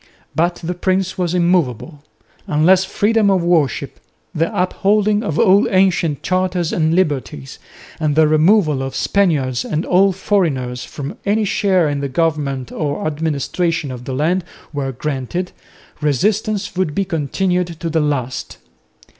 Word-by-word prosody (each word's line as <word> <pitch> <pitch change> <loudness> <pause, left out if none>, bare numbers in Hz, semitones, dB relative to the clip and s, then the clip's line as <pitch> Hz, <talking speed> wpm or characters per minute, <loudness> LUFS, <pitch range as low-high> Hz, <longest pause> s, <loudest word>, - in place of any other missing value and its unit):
But 175 +2 +1
the 175 +2 -2
prince 185 +1 -1
was 180 -1 0
immovable. 170 - 0 0.5
Unless 180 +5 +4
freedom 210 +2 +2
of 190 -3 +2
worship, 165 -6 0 0.3
the 165 +2 0
upholding 205 +2 +1
of 160 -9 -3
all 195 +4 +4
ancient 185 -6 +1
charters 185 -2 0
and 160 0 +1
liberties 140 - -2 0.4
and 155 -2 0
the 155 0 +5
removal 155 -1 +3
of 135 0 -4
Spaniards 145 -11 +1
and 155 +2 -2
all 195 +2 +4
foreigners 155 -11 -1
from 140 -1 -7
any 210 +2 +1
share 190 -4 +2
in 145 -1 -1
the 140 0 -3
government 140 -4 -1
or 145 -1 -3
administration 155 0 -1
of 125 -1 -8
the 135 - -4
land 170 +6 +1 0.3
were 140 -2 -2
granted, 145 +7 -4 0.5
resistance 205 - 0
would 180 -5 -1
be 195 - 0
continued 180 +2 -1
to 170 - -3
the 160 -1 +1
last. 135 -4 -3
165 Hz, 140 wpm, -18 LUFS, 145-185 Hz, 0.5 s, the